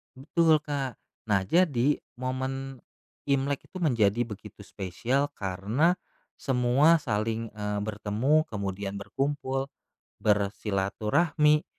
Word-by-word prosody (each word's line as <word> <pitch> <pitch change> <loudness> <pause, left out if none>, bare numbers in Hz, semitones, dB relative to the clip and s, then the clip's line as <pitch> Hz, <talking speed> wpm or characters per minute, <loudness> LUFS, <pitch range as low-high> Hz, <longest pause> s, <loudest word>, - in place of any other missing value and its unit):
Betul, 155 +3 +3
Kak. 140 -4 -3 0.3
Nah, 100 - +4
jadi 150 - +3 0.2
momen 130 0 -3 0.4
Imlek 140 0 0
itu - - -8
menjadi 120 - +2
begitu 105 -1 -10
spesial 120 +11 -1
karena 105 - +1 0.4
semua 135 +5 +4
saling, 115 -2 -1
eee, 105 -1 -2
bertemu, 110 +8 +1
kemudian 100 -1 -4
berkumpul, 135 +3 -2 0.5
bersilaturahmi, 105 - +2
125 Hz, 90 wpm, -28 LUFS, 105-145 Hz, 0.5 s, Nah